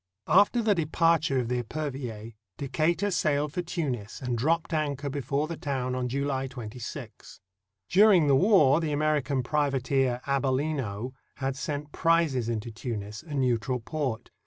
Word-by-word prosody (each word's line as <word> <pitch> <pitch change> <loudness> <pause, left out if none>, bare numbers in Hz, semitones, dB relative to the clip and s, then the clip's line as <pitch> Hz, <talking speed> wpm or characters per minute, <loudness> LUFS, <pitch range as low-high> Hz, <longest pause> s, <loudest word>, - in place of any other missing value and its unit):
After 205 +8 +4
the 215 -1 +4
departure 165 -3 +2
of 125 -2 0
the 125 0 0
Epervier, 120 -5 -5 0.2
Decatur 165 +8 0
sailed 150 -3 +1
for 180 - -1
Tunis 135 - -4
and 125 -2 -2
dropped 160 +8 0
anchor 145 -2 -1
before 140 +2 -1
the 165 - -4
town 130 -3 -2
on 125 -1 -1
July 135 0 -1
26. 120 -2 -8 0.5
During 195 - +6
the 140 - +4
war 160 -4 +5
the 160 -2 -1
American 145 -3 +1
privateer 135 -3 +1
Abellino 130 -4 -1 0.2
had 135 -1 -2
sent 145 +1 -4
prizes 160 -8 +2
into 115 0 -3
Timis, 110 -2 -5
a 155 -2 -7
neutral 125 -1 +1
port. 130 -1 -4
140 Hz, 140 wpm, -28 LUFS, 125-155 Hz, 0.5 s, During